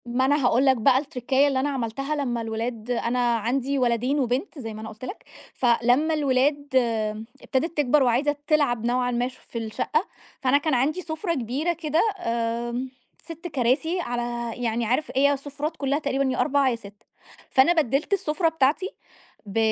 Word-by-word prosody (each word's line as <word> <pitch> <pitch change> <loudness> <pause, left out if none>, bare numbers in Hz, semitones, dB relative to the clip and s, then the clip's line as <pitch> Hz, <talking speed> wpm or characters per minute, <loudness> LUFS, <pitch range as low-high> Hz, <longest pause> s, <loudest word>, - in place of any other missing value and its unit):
ما 245 +2 +1
أنا 285 0 +2
هاقول 250 +2 +3
لك 265 -1 +4
بقى 250 +3 +4
التركّاية 270 0 +1
اللي 270 -2 +1
أنا 280 +2 0
عملتها 275 +2 -2
لما 245 -5 -1
الولاد 225 +1 -4
أنا 240 0 +1
عندي 255 +5 -1
ولدين 250 +3 +1
وبنت 265 - -1
زي 225 -4 -6
ما 215 - -8
أنا 220 - -6
قُلت 220 +4 -9
لك، 390 - -8 0.3
فلما 245 +5 +2
الولاد 285 0 +1 0.7
ابتدِت 320 +5 -2
تكْبر 290 0 +4
وعايزة 260 +4 +2
تلعب 280 -7 +2
نوعًا 245 +1 +1
ما 245 0 0
في 255 -2 -10
الشقة، 230 - -1 0.3
فأنا 265 0 +4
كان 300 +1 -1
عندي 280 +8 +1
سُفرة 335 +1 -3
كبيرة 275 +6 -1
كده 315 -1 0 0.2
آمم، 235 0 -2 0.3
6 335 +1 -8
كراسي 290 +5 0
على 240 -4 -3
يعني 230 0 0
عارف 255 +7 0
هي 280 +2 +4
السُفرات 290 +3 -5
كلها 280 +1 0
تقريبًا 275 -2 0
يا 255 - -2
4 280 -1 +3
يا 245 - 0
6 205 -3 -14 0.4
فأنا 270 +6 +5
بدّلت 300 - +1
السُفرة 325 -3 +1
بتاعتي 320 +4 +1 0.6
ب 200 +1 -6
260 Hz, 165 wpm, -25 LUFS, 240-295 Hz, 0.7 s, فأنا